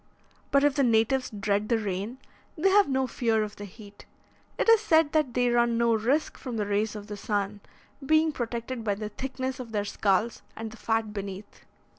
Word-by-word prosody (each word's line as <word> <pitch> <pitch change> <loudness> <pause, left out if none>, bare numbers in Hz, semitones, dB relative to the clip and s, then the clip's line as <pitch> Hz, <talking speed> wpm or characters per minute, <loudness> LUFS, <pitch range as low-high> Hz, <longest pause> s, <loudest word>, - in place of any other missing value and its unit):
But 280 0 +3
if 290 -1 +4
the 275 - +2
natives 240 +2 +2
dread 205 0 -1
the 230 - +3
rain, 205 +3 -3 0.4
they 365 +5 +3
have 400 -3 +5
no 265 -1 +1
fear 230 -3 0
of 210 -1 -7
the 205 - -7
heat. 205 +1 -14 0.5
It - - 0
is 455 -2 +7
said 320 -7 +3
that 300 -6 +1
they 245 -1 +3
run 235 -1 +2
no 235 0 +3
risk 250 +8 0
from 245 -4 -5
the 210 - 0
rays 205 +2 0
of 205 -1 -7
the 210 0 -6
sun, 205 0 -2 0.4
being 315 +3 +3
protected 240 -2 -4
by 205 -2 0
the 210 +1 -5
thickness 260 +3 -4
of 235 -3 -8
their 205 -1 0
skulls 205 +3 0
and 225 0 -6
the 230 - -12
fat 225 -2 -1
beneath. 200 0 -7
230 Hz, 200 wpm, -27 LUFS, 210-265 Hz, 0.5 s, is